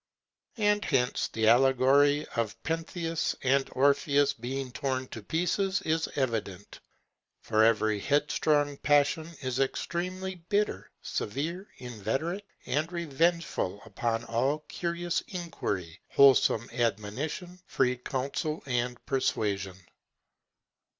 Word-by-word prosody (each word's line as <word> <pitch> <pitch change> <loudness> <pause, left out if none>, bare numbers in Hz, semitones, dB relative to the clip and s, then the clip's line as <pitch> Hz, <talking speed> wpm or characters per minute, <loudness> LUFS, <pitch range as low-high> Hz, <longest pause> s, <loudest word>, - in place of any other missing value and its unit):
And 210 -1 +2
hence 125 -5 +1
the 110 -1 0
allegory 135 +4 +5
of 115 -3 -1
Pentheus 165 0 -2
and 135 +1 +2
Orpheus 140 +1 +3
being 130 +2 -4
torn 130 -1 -2
to 110 - -7
pieces 190 - 0
is 160 0 0
evident; 110 -7 -3 0.6
for 110 0 +3
every 110 -2 +3
headstrong 145 +2 +1
passion 150 +3 +2
is 130 0 -2
extremely 185 +7 -2 0.2
bitter, 210 0 0
severe, 165 - -3
inveterate, 135 - -3 0.2
and 150 +6 -1
revengeful 170 - 0
upon 115 +2 -2
all 130 +6 0
curious 170 0 -2
inquiry, 105 - -4
wholesome 130 -4 +5
admonition, 125 - -2
free 125 -1 +1
counsel, 140 +5 -3
and 125 -2 -2
persuasion. 100 -8 -1
140 Hz, 100 wpm, -29 LUFS, 120-165 Hz, 0.6 s, allegory